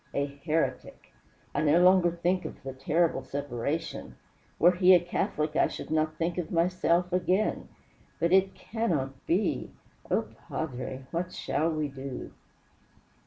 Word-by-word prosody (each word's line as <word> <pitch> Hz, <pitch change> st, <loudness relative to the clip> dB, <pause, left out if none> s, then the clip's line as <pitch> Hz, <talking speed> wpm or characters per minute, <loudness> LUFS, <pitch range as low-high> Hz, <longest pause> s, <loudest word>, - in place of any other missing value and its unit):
A 140 Hz, -, +1 dB
heretic! 150 Hz, +3 st, -3 dB, 0.4 s
I -, -, 0 dB
no 155 Hz, +2 st, +4 dB
longer 180 Hz, -1 st, +6 dB
think 175 Hz, +2 st, 0 dB
of -, -, -8 dB
the 135 Hz, 0 st, -5 dB
terrible 155 Hz, +6 st, +1 dB
separation. 140 Hz, +3 st, -4 dB, 0.4 s
Were 175 Hz, -, +6 dB
he 180 Hz, +1 st, +6 dB
a -, -, +6 dB
Catholic 170 Hz, -3 st, -2 dB
I -, -, +4 dB
should -, -, -7 dB
not 155 Hz, 0 st, +1 dB
think 170 Hz, +1 st, -1 dB
of 165 Hz, -, -3 dB
myself 175 Hz, +1 st, +1 dB
again. 185 Hz, +3 st, +1 dB, 0.5 s
But 170 Hz, +2 st, +2 dB
it 190 Hz, 0 st, +4 dB
cannot 150 Hz, -, -3 dB
be. 185 Hz, +3 st, 0 dB, 0.4 s
Oh, -, -, +1 dB, 0.2 s
padre, 130 Hz, -3 st, -4 dB
what 175 Hz, +2 st, -2 dB
shall 160 Hz, +2 st, -1 dB
we 155 Hz, -2 st, -1 dB
do?" 135 Hz, -1 st, -7 dB
165 Hz, 140 wpm, -28 LUFS, 145-180 Hz, 0.5 s, longer